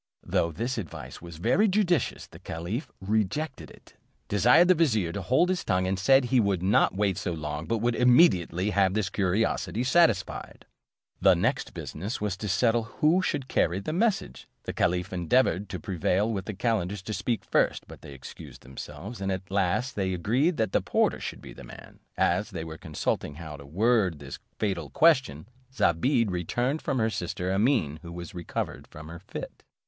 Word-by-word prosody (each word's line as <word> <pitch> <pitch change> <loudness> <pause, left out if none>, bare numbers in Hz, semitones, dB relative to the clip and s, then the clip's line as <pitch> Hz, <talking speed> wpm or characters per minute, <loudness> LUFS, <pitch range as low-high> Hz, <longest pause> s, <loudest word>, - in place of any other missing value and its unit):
Though 85 - 0
this 115 +9 -3
advice 90 -8 -8
was 85 -2 -10
very 190 - +3
judicious, 180 - +1
the - - -15
caliph 90 - -5
rejected 110 +9 -2
it, - - -18 0.3
desired 125 - +5
the 185 - +7
vizier 115 - +1
to 100 - -4
hold 130 - +2
his 185 -2 -1
tongue, 90 0 +1
and 95 +1 -1
said, 135 +7 +5
he 125 +1 +2
would 100 -5 +1
not 95 -1 +3
wait 100 -2 0
so 90 - -2
long, 75 0 -5
but 115 - 0
would 120 0 +2
immediately 105 - +4
have 95 -1 +2
his 105 -3 -1
curiosity 105 +4 0
satisfied. 125 - +1 0.6
The 95 -1 +6
next 85 - -1
business 100 +9 -5
was 105 -3 -2
to 105 - -5
settle 115 +4 +2
who 160 +9 +2
should 145 -7 -2
carry 85 -5 +1
the 125 +10 -4
message. 185 - -1 0.2
The - - -5
caliph 90 +2 0
endeavoured 95 +2 +1
to - - -5
prevail 100 +3 0
with 95 -3 -3
the 110 - -5
calenders 105 -3 -1
to 110 - -5
speak 115 +1 -2
first; - - +1
but - - -12
they 70 - -10
excused 65 - -11
themselves, 75 - -8
and 95 0 -1
at 95 +1 -5
last 100 +7 0
they 95 -2 -1
agreed 125 - +1
that 110 -4 0
the - - +2
porter - - +1
should - - -6
be - - -10
the - - -12
man: - - -13 0.2
as 105 - +1
they 85 -6 -5
were 80 0 -8
consulting 75 -1 -3
how 80 -1 -8
to 70 -1 -12
word 100 - +2
this 70 -1 -9 0.2
fatal 90 -8 -2
question, 135 - +3 0.2
Zobeide 115 - +2
returned 120 - -1
from 135 - -1
her 110 -2 +1
sister 90 0 -3
Amene, 95 - +1
who 85 -1 -9
was 85 0 -8
recovered 85 -2 -5
of 75 0 -10
her 85 +1 -9
fit. 95 - -8
100 Hz, 185 wpm, -27 LUFS, 85-120 Hz, 0.6 s, the